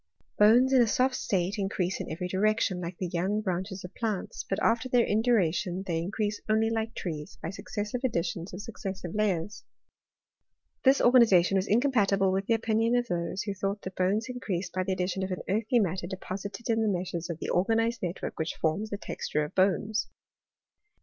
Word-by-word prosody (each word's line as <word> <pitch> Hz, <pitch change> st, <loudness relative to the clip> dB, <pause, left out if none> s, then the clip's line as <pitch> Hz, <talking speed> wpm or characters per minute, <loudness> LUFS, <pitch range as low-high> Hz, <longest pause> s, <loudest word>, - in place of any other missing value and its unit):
Bones 240 Hz, +6 st, +6 dB
in 260 Hz, -, +7 dB
a 235 Hz, -, +4 dB
soft 255 Hz, +5 st, +2 dB
state 195 Hz, -3 st, -1 dB
increase 190 Hz, -2 st, -1 dB
in -, -, -6 dB
every 170 Hz, +3 st, -3 dB
direction, 190 Hz, -1 st, +1 dB
like 170 Hz, 0 st, -5 dB
the 185 Hz, -, -3 dB
young 180 Hz, +4 st, -1 dB
branches 190 Hz, -1 st, -3 dB
of 180 Hz, -, -9 dB
plants; 215 Hz, -5 st, -3 dB
but 195 Hz, -, 0 dB
after 230 Hz, +3 st, +1 dB
their 245 Hz, -2 st, +4 dB
induration 195 Hz, -5 st, +1 dB
they 165 Hz, -3 st, -1 dB
in 170 Hz, +3 st, -3 dB
crease 210 Hz, 0 st, -2 dB
only 220 Hz, +1 st, +3 dB
like 225 Hz, 0 st, -2 dB
trees, 155 Hz, -4 st, -5 dB
by 165 Hz, -, -3 dB
successive 210 Hz, +3 st, -4 dB
additions 170 Hz, -6 st, -1 dB
of 185 Hz, +3 st, -7 dB
suc 230 Hz, -, -10 dB
cessive 190 Hz, -3 st, -4 dB
layers. 205 Hz, -2 st, -1 dB, 1.2 s
This 270 Hz, +1 st, +5 dB
organization 220 Hz, -7 st, +5 dB
was 190 Hz, +1 st, +1 dB
incompatible 205 Hz, -5 st, +3 dB
with 195 Hz, +1 st, -1 dB
the 230 Hz, -, +4 dB
opinion 225 Hz, +1 st, +1 dB
of 245 Hz, 0 st, +2 dB
those 175 Hz, +2 st, -2 dB
who 205 Hz, -, -3 dB
thought 195 Hz, +1 st, -3 dB
that 185 Hz, -, -6 dB
bones 195 Hz, +5 st, +1 dB
in 250 Hz, -1 st, -5 dB
creased 190 Hz, -6 st, -3 dB
by 185 Hz, -, 0 dB
the 190 Hz, 0 st, -1 dB
addition 185 Hz, +1 st, -2 dB
of 190 Hz, -, -2 dB
an 185 Hz, -, -4 dB
earthy 220 Hz, +5 st, +1 dB
matter 185 Hz, -4 st, 0 dB
deposited 195 Hz, +4 st, -6 dB
in 225 Hz, -1 st, +2 dB
the 220 Hz, -, +1 dB
meshes 175 Hz, -3 st, -3 dB
of 170 Hz, -, -3 dB
the -, -, -5 dB
organized 225 Hz, +5 st, +1 dB
network 175 Hz, -1 st, -4 dB
which 160 Hz, +1 st, -2 dB
forms 185 Hz, +7 st, -1 dB
the 205 Hz, -, -3 dB
texture 150 Hz, -6 st, -2 dB
of 150 Hz, -, -10 dB
bones. 200 Hz, +3 st, +1 dB
195 Hz, 195 wpm, -28 LUFS, 180-225 Hz, 1.2 s, in